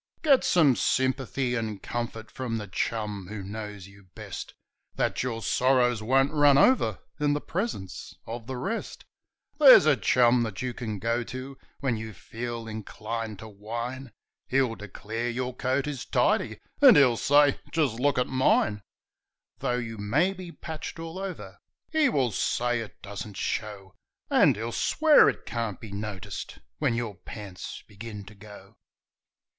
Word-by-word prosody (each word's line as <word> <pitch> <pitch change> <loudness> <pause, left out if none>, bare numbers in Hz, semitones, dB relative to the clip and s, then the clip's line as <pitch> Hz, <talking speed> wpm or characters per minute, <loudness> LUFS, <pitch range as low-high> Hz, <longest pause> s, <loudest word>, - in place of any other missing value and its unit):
Get 280 -4 +5
some 150 -8 +4
sympathy 130 0 0
and 110 -4 -2
comfort 115 -1 -5
from 120 -3 -3
the 105 - -4
chum 105 0 -3
who 105 0 -6
knows 105 -1 -7
you 100 0 -17
best, - - -7 0.4
Then - - +1
your 115 -3 -3
sorrows 125 -3 +2
won't 135 +5 +3
run 145 -2 +5
over 145 - +4 0.2
in 145 -1 +2
the 145 - 0
presence 165 - -4
of 115 0 -7
the 130 -1 -4
rest; 225 - -4 0.5
There's 270 - +9
a 155 -2 +5
chum 120 +2 +4
that 110 -5 -3
you 125 -1 -2
can 110 -3 -4
go 115 +4 0
to 130 +3 -7 0.3
when 130 -5 0
you 110 0 -6
feel 115 +2 -6
inclined 110 0 -5
to 110 - -9
whine, 120 +5 -6 0.4
He'll 130 -3 +2
declare 110 +3 -5
your 125 +1 -3
coat 130 +2 0
is 145 -4 -4
tidy, - - +1 0.2
and - - +9
he'll 130 -5 +6
say: 145 +3 +4
"Just 140 -8 0
look 140 +1 +2
at 125 - +3
mine 120 -5 +2 0.4
!" - - -52
Though 125 - 0
you 115 -3 -5
may 145 - +2
be 185 -2 -9
patched 160 0 -7
all 165 +2 -6
over 195 -1 -7 0.3
he 315 -3 +3
will 130 - +1
say 120 +4 0
it 115 -2 -8
doesn't 100 0 -7
show, 100 -4 -4 0.4
And - - +5
he'll 115 +3 -4
swear 310 - +5
it - - -5
can't 115 -3 -3
be 110 - -9
noticed 100 -1 -6 0.2
when 115 - +1
your 115 -3 -2
pants 95 +1 -8
begin 105 0 -9
to 105 - -12
go. 105 0 -14
120 Hz, 160 wpm, -27 LUFS, 105-135 Hz, 0.5 s, There's